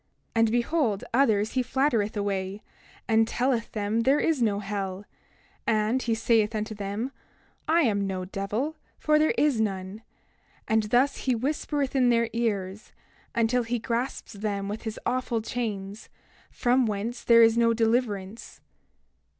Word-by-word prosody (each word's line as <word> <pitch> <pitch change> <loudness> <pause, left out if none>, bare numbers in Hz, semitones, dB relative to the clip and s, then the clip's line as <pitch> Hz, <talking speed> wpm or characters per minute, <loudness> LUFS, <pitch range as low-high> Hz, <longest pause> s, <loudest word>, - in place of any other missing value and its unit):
28:22 - - -2
And 225 -1 +4
behold, 240 -3 0
others 220 -5 +3
he 260 - +1
flattereth 245 -5 0
away, 200 0 -2 0.4
and 225 0 +3
telleth 245 -1 0
them 210 +1 -1
there 270 +5 +3
is 315 -6 +1
no 210 -3 +2
hell; 200 -1 -4 0.6
and 220 +3 +1
he 230 -3 0
saith 225 -1 +2
unto 215 +1 -3
them: 205 +5 -4 0.6
I 330 +2 +4
am 200 -8 +1
no 185 -1 -3
devil, 210 +11 -3 0.2
for 305 0 +3
there 310 - +2
is 285 -7 +2
none—and 210 +2 -4
thus 250 +6 +2
he 255 -2 0
whispereth 280 +2 -2
in 255 -2 +4
their 235 -1 +2
ears, 210 -3 -2 0.4
until 235 +2 +2
he 240 +1 -2
grasps 235 +2 -3
them 200 -1 -3
with 210 +3 -5
his 220 -1 -4
awful 245 -2 0
chains, 215 -3 -5 0.4
from 245 0 +2
whence 220 +4 -3
there 230 -1 +7
is 225 0 +5
no 230 0 +4
deliverance. 225 -3 -1
225 Hz, 145 wpm, -26 LUFS, 205-245 Hz, 0.6 s, there